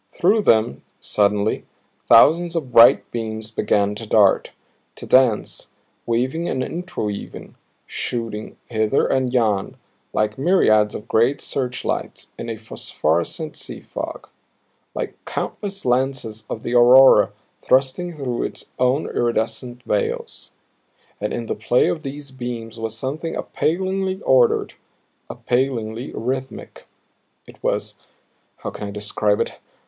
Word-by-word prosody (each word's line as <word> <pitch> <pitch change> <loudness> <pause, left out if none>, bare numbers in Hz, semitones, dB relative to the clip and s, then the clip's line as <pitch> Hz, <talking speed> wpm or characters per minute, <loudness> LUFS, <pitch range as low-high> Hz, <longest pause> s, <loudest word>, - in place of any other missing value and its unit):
Through 205 +5 +2
them, 110 - +2 0.2
suddenly, 105 +1 +1 0.4
thousands 165 +9 +6
of 145 -7 -3
bright 115 0 +6
beams 110 -1 -4
began 100 -2 +1
to 110 +1 -8
dart, 105 -2 +4 0.5
to - - -8
dance, 130 -5 +2 0.4
weaving 130 +9 0
and 130 - -1
interweaving, 160 - -5 0.3
shooting 115 -3 -4
hither 110 +2 +1
and 130 -2 +1
yon 110 -6 0 0.3
like 110 +2 -1
myriads 110 - +3
of 105 - -8
great 120 +6 +2
searchlights 125 -2 -3
in 115 - -5
a 115 - -4
phosphorescent 105 - -2
sea - - -7
fog, - - -7 0.7
like - - -5
countless 200 -1 -5
lances 125 -4 -1
of 110 - -5
the 120 - -3
aurora 125 +2 +7 0.3
thrusting 135 +7 +1
through 130 -5 -3
its - - -5
own 130 +4 +2
iridescent 120 +1 -2
veils! 105 -3 -2 0.7
And 105 - -2
in 120 - -3
the - - -2
play 110 +3 +2
of 155 - -2
these 140 0 -7
beams 120 -3 -6
was 115 0 -3
something 150 +7 -4
appallingly 190 +3 -1
ordered, 125 -3 +3 0.6
appallingly 120 -2 -2
rhythmic. 130 +2 -5 0.6
It - - -16
was - - -2 0.6
how - - -6
can 105 - -6
I - - -6
describe 105 0 0
it? - - -2
120 Hz, 125 wpm, -21 LUFS, 110-135 Hz, 0.7 s, aurora